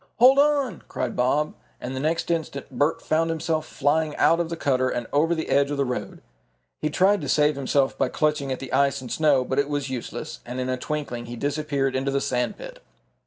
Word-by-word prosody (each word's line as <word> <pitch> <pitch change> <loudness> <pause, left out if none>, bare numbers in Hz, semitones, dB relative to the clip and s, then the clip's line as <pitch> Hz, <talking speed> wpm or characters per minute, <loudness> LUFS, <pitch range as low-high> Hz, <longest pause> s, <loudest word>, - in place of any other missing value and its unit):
"Hold 260 +3 +7
on!" 285 - +2
cried - - -3
Bob, 140 +5 +1 0.3
and 130 +2 -5
the - - -3
next 160 +4 0
instant 160 -4 -3
Bert 145 +2 0
found 165 +1 +1
himself 160 -1 -1
flying 150 +2 0
out 165 - +4
of 170 -1 -1
the 170 - -4
cutter 130 -4 +1
and 120 -1 -2
over 160 +4 +3
the 160 - -3
edge 140 0 +3
of 145 - -2
the 140 - +1
road. 125 0 -5 0.6
He 155 - 0
tried 190 +5 +3
to 145 - -4
save 150 0 +3
himself 135 0 +1
by 130 - +2
clutching 150 -3 0
at 130 - -1
the 135 - -8
ice 140 0 +3
and 125 -2 -8
snow, 145 -5 +3
but 130 +2 0
it 140 0 +1
was 145 -2 -2
useless, 125 -3 -5
and 125 +2 -6
in 130 0 -2
a 130 - +1
twinkling 125 -4 -4
he 120 - -6
disappeared 140 0 -1
into 135 +1 0
the 140 0 +1
sand 125 -2 -1
pit! - - -10
145 Hz, 220 wpm, -24 LUFS, 130-160 Hz, 0.6 s, Hold